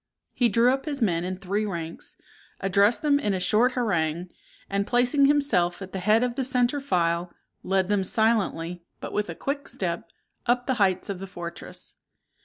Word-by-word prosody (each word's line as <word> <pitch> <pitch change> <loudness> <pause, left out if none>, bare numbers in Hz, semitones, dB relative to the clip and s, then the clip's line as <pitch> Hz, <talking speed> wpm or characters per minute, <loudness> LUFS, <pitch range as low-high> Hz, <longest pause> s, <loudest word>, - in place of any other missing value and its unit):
He 240 -2 +2
drew 235 +4 +4
up 270 - -3
his 290 -3 -3
men 175 -8 +1
in 185 +1 -3
three 195 +3 -1
ranks, 170 -5 -5 0.4
addressed 200 +6 +3
them 285 -1 +4
in 205 -8 0
a - - -1
short 230 +7 +3
harangue, 175 -7 -1 0.4
and, 200 0 -1
placing 250 +3 +3
himself 275 -12 +2
at 190 -1 -9
the 190 - -2
head 215 +5 +3
of 250 -1 0
the 265 - -2
centre 255 +2 +1
file, 175 -7 0 0.3
led 190 -1 +1
them 205 -1 +1
silently, 190 -5 0 0.2
but - - -7
with 210 -3 -1
a 170 - -5
quick 280 - -3
step, - - -2 0.4
up 245 +1 +2
the 260 - +1
heights 190 -2 +2
of 195 -2 -3
the 195 - -6
fortress. 170 -2 -8
205 Hz, 185 wpm, -26 LUFS, 180-245 Hz, 0.4 s, drew